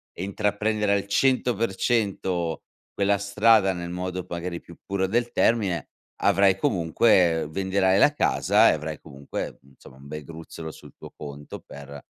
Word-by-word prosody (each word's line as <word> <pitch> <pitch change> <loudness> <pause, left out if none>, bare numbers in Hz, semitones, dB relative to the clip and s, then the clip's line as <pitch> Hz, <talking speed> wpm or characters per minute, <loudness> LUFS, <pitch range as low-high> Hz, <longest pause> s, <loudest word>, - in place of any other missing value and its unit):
e 90 - -5
intraprendere 105 +1 0
al 100 0 -1
100% 100 -7 0 0.3
quella 100 0 +1
strada 100 0 +3
nel 85 -1 -6
modo, 90 0 -4
p - - -27
magari, 85 0 -4
più 85 - -15
puro 95 -1 -1
del 120 +4 0
termine, 100 -8 +1 0.3
avrai 100 -1 +4
comunque 85 -2 +2
venderai 95 +2 +1
la 145 - +5
casa - - +3
e - - +1
avrai, 75 0 -5
comunque, 70 0 -7
mhmm, 70 - -22
insomma 65 0 -17
un 70 +1 -14
bel 75 +1 -7
gruzzolo 80 0 -9
sul - - -15
tuo - - -11
conto 75 0 -9
per 70 0 -11
95 Hz, 155 wpm, -25 LUFS, 80-100 Hz, 0.3 s, la